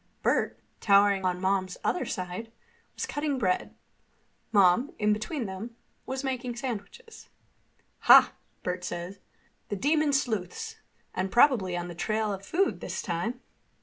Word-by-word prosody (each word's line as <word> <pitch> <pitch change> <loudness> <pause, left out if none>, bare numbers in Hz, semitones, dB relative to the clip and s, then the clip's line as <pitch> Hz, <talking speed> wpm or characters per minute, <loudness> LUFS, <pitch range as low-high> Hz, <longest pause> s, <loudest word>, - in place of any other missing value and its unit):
Bert, - - +1 0.2
towering 200 -1 +4
on 180 -1 0
Mom's 190 -1 0
other 360 - 0
side, 185 +3 -5 0.4
was - - -3
cutting 290 -2 -2
bread. 185 -7 0 0.8
Mom, 200 +4 +5
between 215 +6 0
them, 205 +5 -7 0.3
was 265 +1 -3
making 255 -2 -3
sandwiches. 245 - -7 0.7
"Ha!" - - +8 0.3
Bert 180 0 -3
said. 180 +3 -5 0.5
"The 205 - -1
demon 300 +7 +2
sleuths—and 275 - -3
probably 225 -8 +4
on 175 0 -4
the 175 - -7
trail 215 +4 -1
of 195 0 -7
food 370 - 0
this - - -4
time." 225 +7 -3
215 Hz, 125 wpm, -28 LUFS, 185-260 Hz, 0.8 s, Ha